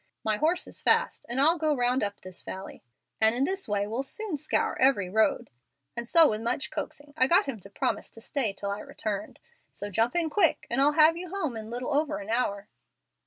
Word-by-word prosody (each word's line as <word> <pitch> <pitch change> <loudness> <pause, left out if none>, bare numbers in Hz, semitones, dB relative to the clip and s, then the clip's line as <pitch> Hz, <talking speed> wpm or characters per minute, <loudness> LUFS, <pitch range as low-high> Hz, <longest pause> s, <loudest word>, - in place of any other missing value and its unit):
My 215 -1 0
horse 340 - +1
is - - -10
fast, - - +2
and 240 +3 -1
I'll 325 +5 +4
go 305 -1 +1
round 245 0 +1
up 200 0 -3
this 185 -1 -8
valley, 190 +1 -8 0.4
and 220 +1 +5
in 255 - +2
this 385 +6 -2
way 205 -1 0
we'll 225 +5 -3
soon 385 +6 -4
scour 300 +2 0
every 230 -9 +3
road;' 215 -1 +1 0.4
and 235 0 -4
so 330 -2 +8
with 215 0 -3
much 235 +5 -2
coaxing 290 0 -6
I 260 - +4
got 340 - +5
him 270 -6 -5
to 195 - -11
promise 200 - -2
to - - -11
stay 265 -3 -1
till 200 0 -5
I 200 - -4
returned. 210 -1 -5 0.3
So 205 0 -6
jump 225 - +1
in 330 -3 0
quick, 350 -4 +2
and 255 +3 +1
I'll 290 +2 +4
have 315 +2 +5
you 360 0 -7
home 320 -9 -3
in 220 0 -7
little 245 +4 -3
over 300 +2 0
an 205 +2 -7
hour." 205 -4 -1
250 Hz, 220 wpm, -27 LUFS, 210-305 Hz, 0.4 s, so